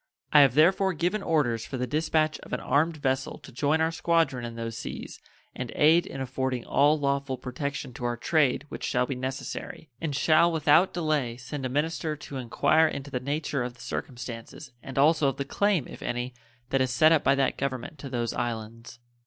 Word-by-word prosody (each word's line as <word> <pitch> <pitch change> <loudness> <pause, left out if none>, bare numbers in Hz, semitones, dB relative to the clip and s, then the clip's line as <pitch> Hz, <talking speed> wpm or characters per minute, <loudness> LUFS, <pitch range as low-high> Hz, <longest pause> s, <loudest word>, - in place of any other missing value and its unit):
I 150 - +9
have 135 -3 +6
therefore 190 +5 +4
given 180 +6 -1
orders 125 - +1
for 135 - -5
the 125 - -1
dispatch 155 +3 0
of - - -11
an - - 0
armed 155 +4 +1
vessel 130 -2 -1
to - - -14
join 145 +5 +1
our 160 0 +2
squadron 165 -6 +1
in 115 -1 -7
those 115 -1 -5
seas - - -7 0.4
and - - -5
aid 160 +3 +5
in 135 - -7
affording 130 -1 -2
all 145 +2 +4
lawful 140 -2 -1
protection 125 +1 -5
to 120 - -6
our 120 0 -1
trade 145 +1 +1
which - - -7
shall 125 -1 +1
be 135 - -3
necessary, 130 +3 -5
and 155 -4 -2
shall 165 +4 +4
without 160 +3 +4
delay 150 -8 -1
send 130 +2 -5
a - - -7
minister 155 +3 -1
to 145 -2 -8
inquire 155 +6 +3
into 140 -2 -5
the 125 - -1
nature 140 +1 -2
of 120 0 -4
the 120 - -15
circumstances 120 +2 -6
and 135 +1 -9
also 150 +1 +4
of 135 - -1
the 140 - -2
claim, 195 -1 +1
if - - -11
any, 120 +1 -3 0.4
that 135 - +2
is 130 - +1
set 155 +6 +5
up 160 -3 +4
by 135 - +4
that 135 -1 +1
Government 140 +3 -4
to 135 - -7
those 120 -2 -2
islands. 115 0 -5
140 Hz, 200 wpm, -27 LUFS, 125-155 Hz, 0.4 s, I